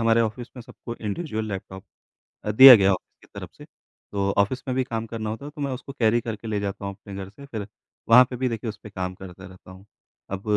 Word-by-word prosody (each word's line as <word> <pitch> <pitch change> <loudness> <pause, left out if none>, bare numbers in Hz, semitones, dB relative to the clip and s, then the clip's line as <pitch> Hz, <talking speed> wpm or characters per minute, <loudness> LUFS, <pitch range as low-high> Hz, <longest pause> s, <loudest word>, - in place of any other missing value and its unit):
हमारे 115 0 +3
ऑफ़िस 115 +2 -2
में 125 - -8
सबको 120 -1 -9
इंडिविडुअल 110 - -3
लैपटॉप 95 -1 -7 0.6
अ, 105 - -1
दिया 130 +4 +11
गया 100 -4 +4
है - - +5
ऑफ़िस - - -11
की - - -38
तरफ - - -8
से। - - -11
तो 100 -1 -6
ऑफ़िस 115 +6 +1
में 130 - 0
भी 130 - +1
काम 115 -3 -4
करना 110 -1 -5
होता 115 +5 -6
है, 145 - -7
तो 150 - -11
मैं 140 -2 -2
उसको 130 +2 -7
कैरी 120 -3 +2
करके 115 -1 -6
ले 105 -2 -1
जाता 100 0 -4
हूँ 100 - -4
अपने 100 +1 -12
घर 95 -1 -6
से, 140 +7 -14
फिर 110 -7 -6 0.4
वहाँ 125 +3 +9
पे 125 - -5
भी 130 +1 0
देखिए 115 -1 -4
उसपे 105 0 -8
काम 95 -2 -4
करता 95 0 -12
रहता 95 -1 -15
हूँ। 95 +1 -14 0.5
अब 95 0 -4
110 Hz, 250 wpm, -24 LUFS, 100-125 Hz, 0.6 s, दिया